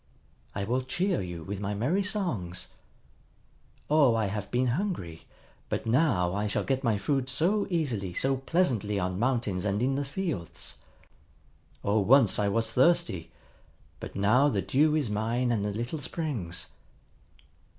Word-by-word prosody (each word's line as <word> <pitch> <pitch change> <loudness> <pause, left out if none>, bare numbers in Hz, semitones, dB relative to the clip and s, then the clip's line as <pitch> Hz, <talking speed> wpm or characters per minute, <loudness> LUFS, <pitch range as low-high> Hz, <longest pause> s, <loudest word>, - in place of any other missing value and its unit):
I 100 - -2
will 125 +6 0
cheer 180 - 0
you 90 -3 -6
with 100 +2 -5
my 105 0 -2
merry 145 - +1
songs. 175 - -2 1.2
Oh, 145 -6 +4
I 110 -1 +1
have 100 0 -4
been 125 +1 +1
hungry; 120 - -3 0.4
but - - -2
now 115 - +2
I 105 +1 -1
shall 105 - -1
get 135 0 -1
my 115 -4 +2
food 130 +5 -1
so 180 +11 +1
easily, 125 - -1
so 135 +9 0
pleasantly 130 - 0
on 90 0 -1
mountains 115 -6 0
and 100 0 0
in 135 +2 +2
the 140 +1 -1
fields. 140 - -4 1.0
Oh, 105 +2 +2
once 115 -1 +5
I 105 - +2
was 110 +2 0
thirsty; 130 - +2 0.7
but - - -8
now 120 +9 +4
the 100 -8 -1
dew 150 +3 +3
is 140 -9 0
mine 115 +4 0
and 110 -4 0
the 105 - -1
little 120 +9 -3
springs. 130 - -3
120 Hz, 150 wpm, -28 LUFS, 100-145 Hz, 1.2 s, once